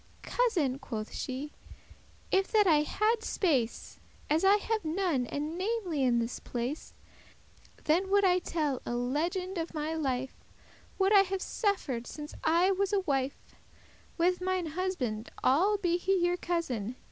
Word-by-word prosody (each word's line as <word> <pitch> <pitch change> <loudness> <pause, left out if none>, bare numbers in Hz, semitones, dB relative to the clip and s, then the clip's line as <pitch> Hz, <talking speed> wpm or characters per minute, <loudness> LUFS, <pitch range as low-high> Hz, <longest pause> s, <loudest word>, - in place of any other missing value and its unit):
"Cousin," 335 - +1
quoth 220 -5 -6
she, 270 +3 -4 0.8
"if 385 0 +3
that 425 -2 +4
I 310 -5 +5
hadde 430 +8 +1
space, 270 - -1 0.3
As 315 +3 +3
I 390 +1 +7
have 435 +1 -1
none, 320 -6 0
and 300 +5 -3
namely* 380 -7 -1
in 245 -2 +3
this 235 +1 -2
place, 245 +5 -5 0.8
*specially - - -24
Then 355 +5 +2
would 405 0 +4
I 365 -1 +4
tell 300 -7 -2
a 240 - -3
legend 340 +9 -1
of 330 0 -4
my 305 +1 -2
life, 265 -4 -2 0.6
What 390 +1 +3
I 405 - +9
have 385 0 -2
suffer'd 290 - -1
since 300 -1 -8
I 340 +4 +4
was 390 +1 0
a 400 -1 +2
wife 275 -6 -1 0.7
With 360 +1 +2
mine 370 -1 0
husband, 305 - -3
all* 365 +11 +4
be 350 -3 +1
he 385 +2 +1
your 350 0 +1
cousin. 255 - -2
335 Hz, 155 wpm, -30 LUFS, 270-385 Hz, 0.8 s, I